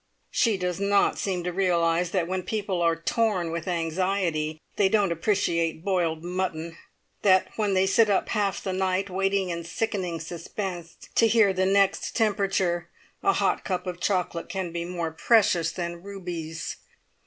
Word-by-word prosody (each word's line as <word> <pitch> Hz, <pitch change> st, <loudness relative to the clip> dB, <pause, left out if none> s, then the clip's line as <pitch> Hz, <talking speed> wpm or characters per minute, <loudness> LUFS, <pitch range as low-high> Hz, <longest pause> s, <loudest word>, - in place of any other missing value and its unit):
She 225 Hz, -4 st, +2 dB
does 180 Hz, -1 st, -2 dB
not 200 Hz, 0 st, +2 dB
seem 185 Hz, -3 st, -1 dB
to 180 Hz, 0 st, -3 dB
realise 175 Hz, -2 st, +2 dB
that 180 Hz, -2 st, 0 dB
when 185 Hz, +1 st, -1 dB
people 200 Hz, -2 st, -2 dB
are 165 Hz, -1 st, +3 dB
torn 180 Hz, 0 st, 0 dB
with 170 Hz, +2 st, -4 dB
anxiety 165 Hz, -2 st, -1 dB, 0.2 s
they 195 Hz, -2 st, +3 dB
don't 205 Hz, -3 st, +2 dB
appreciate 170 Hz, -2 st, 0 dB
boiled 170 Hz, -5 st, 0 dB
mutton; 175 Hz, -2 st, -2 dB
and 165 Hz, -, -15 dB, 0.5 s
that 190 Hz, -2 st, +4 dB
when 205 Hz, -3 st, 0 dB
they 190 Hz, 0 st, +4 dB
sit 215 Hz, +3 st, +4 dB
up 200 Hz, -, +1 dB
half 205 Hz, -3 st, 0 dB
the 190 Hz, -, -2 dB
night, 190 Hz, +1 st, 0 dB
waiting 195 Hz, 0 st, 0 dB
in 170 Hz, 0 st, -4 dB
sickening 180 Hz, -1 st, -2 dB
suspense 170 Hz, +1 st, -6 dB, 0.2 s
to 230 Hz, -, +5 dB
hear 220 Hz, -3 st, +4 dB
the 185 Hz, 0 st, +1 dB
next 195 Hz, 0 st, +2 dB
temperature, 195 Hz, -5 st, +1 dB, 0.3 s
a 395 Hz, -, +3 dB
hot -, -, +1 dB
cup 180 Hz, -1 st, -2 dB
of 180 Hz, -1 st, -5 dB
chocolate 180 Hz, -4 st, -1 dB
can 190 Hz, -3 st, -3 dB
be 170 Hz, 0 st, -3 dB
more 170 Hz, -2 st, -3 dB
precious 175 Hz, -2 st, +3 dB
than 170 Hz, -1 st, -5 dB
rubies. 175 Hz, -5 st, -6 dB
185 Hz, 165 wpm, -26 LUFS, 170-195 Hz, 0.5 s, to